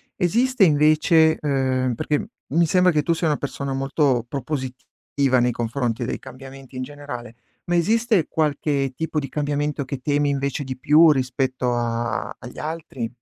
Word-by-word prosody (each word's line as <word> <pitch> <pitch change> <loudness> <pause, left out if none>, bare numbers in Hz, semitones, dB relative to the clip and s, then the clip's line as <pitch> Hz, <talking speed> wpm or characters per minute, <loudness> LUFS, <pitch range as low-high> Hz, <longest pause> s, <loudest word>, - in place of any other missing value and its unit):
Esiste 235 +5 +2
invece 155 +1 +4
ehm, 130 -3 0
perché 150 +5 -1 0.3
mi 170 +1 +4
sembra 180 +1 +3
che 150 -1 +2
tu 170 - 0
sia 165 0 -1
una 150 - +2
persona 140 -1 -4
molto 135 -2 +1
propositiva 130 0 -2
nei 125 0 +2
confronti 120 0 -2
dei - - -3
cambiamenti 135 0 -11
in 130 - -3
generale, 125 -4 -8 0.3
ma 175 - 0
esiste 215 +1 +2
qualche 145 -3 0
tipo 160 -1 -2
di 140 - -4
cambiamento 145 0 -2
che 135 0 -5
temi 145 +1 +1
invece 140 +1 -1
di 130 -1 -6
più 155 +4 +6
rispetto 130 -2 -1
a 120 0 -2
agli 125 - -10
altri? 150 -7 -5
140 Hz, 155 wpm, -22 LUFS, 130-155 Hz, 0.3 s, più